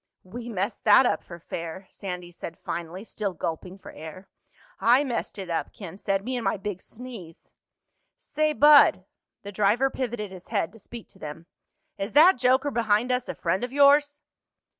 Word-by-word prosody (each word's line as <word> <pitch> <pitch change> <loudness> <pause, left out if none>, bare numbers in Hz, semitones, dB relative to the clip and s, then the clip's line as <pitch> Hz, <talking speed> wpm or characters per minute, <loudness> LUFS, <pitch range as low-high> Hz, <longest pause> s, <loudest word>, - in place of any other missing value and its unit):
"We 235 +6 -8
messed 205 0 -3
that 220 +5 +7
up - - 0
for 170 - -10
fair," 170 +2 -7
Sandy 180 -3 -7
said 170 -1 -8
finally, 175 +3 -6
still 205 -4 -4
gulping 170 +4 -5
for - - -12
air. 160 +5 -10 0.5
"I 250 +4 +5
messed 245 -6 -4
it 195 -2 -6
up," 165 -1 -2
Ken 190 -6 -9
said. 195 -1 -1
"Me 255 +1 -2
and 245 - -3
my 195 - 0
big 195 -2 -5
sneeze." 225 -9 -11 0.6
"Say, 310 +1 -1
bud"—the 275 -9 +4
driver 210 +7 +2
pivoted 235 -6 -4
his 185 -1 -12
head 165 - -1
to 225 - -14
speak 230 +2 -11
to - - -19
them—"is 170 +6 -10
that 315 +1 +7
joker 260 +3 +3
behind 230 +1 +1
us 250 0 -1
a - - -4
friend 185 +6 -1
of 245 - -3
yours?" 290 +1 +4
205 Hz, 170 wpm, -26 LUFS, 185-250 Hz, 0.6 s, that